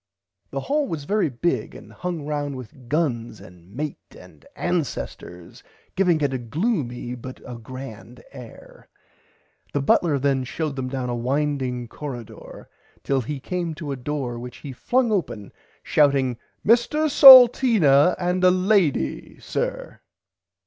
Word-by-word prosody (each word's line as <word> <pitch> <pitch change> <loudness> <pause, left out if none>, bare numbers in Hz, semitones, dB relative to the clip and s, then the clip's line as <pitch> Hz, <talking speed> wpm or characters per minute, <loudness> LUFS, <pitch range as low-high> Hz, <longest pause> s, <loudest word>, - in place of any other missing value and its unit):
The - - -4
hall 290 0 -1
was 160 - -5
very 205 +2 0
big 140 +7 -2
and - - -13
hung 175 -5 -5
round 145 -2 -3
with 125 0 -12
guns 120 -8 -2
and 90 +1 -16
mate 150 +7 -5 0.2
and - - -17
ancesters 90 - -5 0.3
giving 180 -4 +2
it 140 -2 0
a 130 - -2
gloomy 125 - -3
but 130 +1 -9
a 125 - -8
grand 120 0 -10
air. 125 -4 -14 0.8
The 145 - 0
butler 150 +1 +2
then 135 -1 0
showed 150 +3 -4
them 130 -1 -4
down 130 -1 -4
a - - -2
winding 130 -1 -2
corridoor 120 -3 -9 0.4
till 135 -1 0
he 140 +4 -5
came 170 +2 -4
to 150 -2 -6
a - - -2
door 130 -2 -4
which 125 0 -9
he 140 -3 -9
flung 245 - 0
open 120 - -3 0.3
shouting 135 -4 +2 0.3
Mr 240 +8 +3
Salteena 235 - +7
and 180 +1 -1
a 185 - +7
lady 180 - 0
sir. - - -4
140 Hz, 140 wpm, -23 LUFS, 125-175 Hz, 0.8 s, Salteena